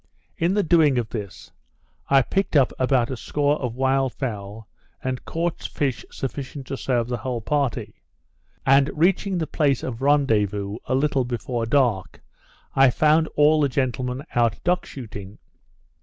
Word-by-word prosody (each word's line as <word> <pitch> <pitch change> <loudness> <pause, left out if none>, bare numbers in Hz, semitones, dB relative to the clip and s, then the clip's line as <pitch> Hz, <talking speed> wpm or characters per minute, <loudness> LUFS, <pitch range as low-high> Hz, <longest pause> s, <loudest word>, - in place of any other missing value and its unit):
In 175 +4 +1
the 205 - +2
doing 155 -5 +4
of 115 -3 -1
this, 105 -5 -7 0.6
I 135 -1 +5
picked 195 +6 -1
up 135 -4 +4
about 130 -1 +2
a - - -2
score 145 +4 0
of 125 -3 -3
wild 135 0 +1
fowl, 105 -4 -5 0.4
and 130 -1 -3
caught 170 0 -2
fish 135 -4 -2
sufficient 135 0 -6
to 135 - -4
serve 120 -3 -1
the 120 0 -2
whole 120 +1 -3
party; 135 - -2 0.6
and 135 +1 +5
reaching 185 +4 +2
the 165 - -1
place 145 -3 0
of 120 -1 -5
rendezvous 105 -8 +1
a 130 - 0
little 135 -1 +1
before 120 -1 -3
dark, 115 - +1 0.6
I 135 -1 +6
found 155 +4 +3
all 150 +1 +4
the 140 - +2
gentlemen 130 0 -2
out 120 -3 +2
duck 180 0 +1
shooting. 105 -6 -9
130 Hz, 155 wpm, -23 LUFS, 120-145 Hz, 0.6 s, I